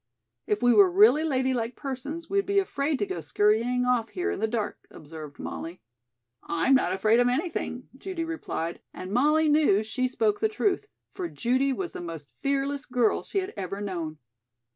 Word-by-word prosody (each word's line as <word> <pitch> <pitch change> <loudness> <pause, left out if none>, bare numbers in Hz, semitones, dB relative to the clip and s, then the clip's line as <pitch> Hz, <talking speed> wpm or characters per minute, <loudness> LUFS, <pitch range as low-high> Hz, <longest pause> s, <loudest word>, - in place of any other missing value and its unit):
"If 210 +3 0
we 245 0 +6
were 200 -4 +7
really 220 - +6
ladylike 260 -5 0
persons 285 +5 -5
we'd 395 +1 0
be 400 0 +1
afraid 300 -7 +1
to 205 - 0
go 175 -4 -4
scurrying 220 +9 +2
off 245 -3 +1
here 370 +3 -2
in - - -4
the 220 - +1
dark," 220 -2 -3
observed 155 -1 -10
Molly. 170 +3 -6 0.6
"I'm 170 +11 +1
not 260 -9 +3
afraid 215 +5 +3
of 245 - +4
anything," 255 -2 -2
Judy 365 +3 -4
replied, 320 - -4
and 185 +1 -7
Molly 300 +7 +3
knew 295 -9 +4
she 255 +4 -1
spoke 415 - 0
the 435 - +2
truth, 420 -1 0 0.3
for 365 -3 -3
Judy 260 +2 +1
was 355 +6 -3
the - - -7
most 165 -4 -8
fearless 275 +1 -1
girl 245 -3 +2
she 395 - -2
had 375 - -6
ever 195 -1 -4
known. 170 -6 -4
250 Hz, 180 wpm, -27 LUFS, 205-310 Hz, 0.6 s, were